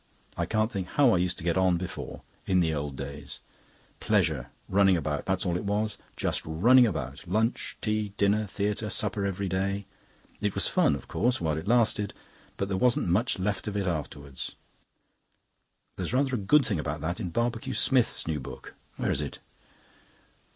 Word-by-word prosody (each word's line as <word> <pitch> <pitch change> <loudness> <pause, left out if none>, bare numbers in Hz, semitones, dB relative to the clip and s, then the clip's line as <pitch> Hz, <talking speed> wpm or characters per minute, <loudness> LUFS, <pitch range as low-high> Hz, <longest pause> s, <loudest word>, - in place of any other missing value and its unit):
I - - -1
can't 110 +1 +1
think 95 -2 -3
how 140 +2 +4
I 95 - +4
used 90 0 0
to 90 - -7
get 85 +1 +1
on 90 -2 +3
before 90 +1 -6 0.2
in 95 -1 +3
the 80 -2 +2
Old 70 -2 -3
Days. 70 +1 -7 0.6
Pleasure - - +1 0.2
running 95 -1 +4
about, 75 -2 -2
that's 95 +1 0
all 90 -2 0
it 90 - -2
was; 105 +2 -1 0.2
just - - -1
running 120 +11 +5
about. 70 - -4
Lunch, 110 +6 0
tea, 105 -2 0
dinner, 105 +1 +2
theatre, 105 +2 -2
supper 100 0 0
every 100 0 -2
day. 100 +2 -1 0.5
It 105 -1 -1
was - - +2
fun, - - +3
of 70 - -9
course, 125 0 +1
while 80 -2 0
it 80 +4 -5
lasted. 110 -3 +2 0.4
But 100 - -1
there 95 -1 -1
wasn't 120 -4 +2
much 105 +8 +2
left 100 +3 -2
of 105 -1 -2
it 100 - 0
afterwards. 70 -5 -4 1.4
There's - - -3
rather 135 +1 +2
a - - +2
good 130 +8 +4
thing 100 -7 0
about 75 0 -3
that 85 +4 -2
in 95 -5 -3
Barbecue 120 +6 -1
Smith's 125 -4 +3
new 80 -2 -1
book. 65 - -9 0.2
Where - - 0
is - - +1
it?" - - -5
100 Hz, 180 wpm, -28 LUFS, 85-110 Hz, 1.4 s, running